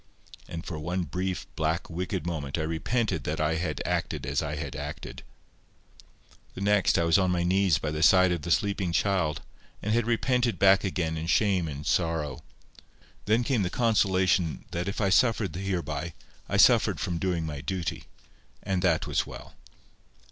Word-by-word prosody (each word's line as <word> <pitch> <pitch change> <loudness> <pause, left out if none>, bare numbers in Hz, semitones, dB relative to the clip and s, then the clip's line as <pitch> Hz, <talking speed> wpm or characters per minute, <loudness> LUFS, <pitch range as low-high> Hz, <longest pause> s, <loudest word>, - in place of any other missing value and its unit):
And 85 0 -7
for 80 -3 -5
one 90 +4 -2
brief, 90 +1 -3
black, 80 +2 -1
wicked 90 0 -4
moment 75 -5 -3
I 80 - -1
repented 80 - -1
that 75 +1 -2
I 80 +1 +1
had 80 -4 -3
acted - - -2
as - - 0
I 75 - -3
had 70 -4 -5
acted. - - -7 1.3
The - - -7
next 105 -1 +3
I 85 - +2
was 85 +3 +4
on 95 -1 +2
my 90 -1 +1
knees 95 -1 +3
by 75 - -3
the 75 0 -3
side 90 +2 +6
of 85 -3 -1
the 85 - -6
sleeping 95 +1 0
child, 90 -3 0 0.4
and 105 - -2
had 115 0 +1
repented 120 0 +1
back 100 0 +5
again 85 -5 -1
in 80 +1 -4
shame 95 -2 +2
and 75 -1 -6
sorrow. 80 -4 -1 0.8
Then 110 +4 +2
came 120 -2 +1
the 90 - 0
consolation 95 -7 +1
that 85 +2 -3
if 100 - -3
I 100 -3 +2
suffered 110 -6 +2
hereby, 85 -4 -3 0.3
I - - 0
suffered - - +5
from 85 -2 -2
doing 90 -3 -1
my 75 -3 -5
duty. 95 -1 -3 0.6
And 95 -2 -1
that 85 -3 +2
was - - -1
well. - - -10
90 Hz, 175 wpm, -27 LUFS, 80-100 Hz, 1.3 s, side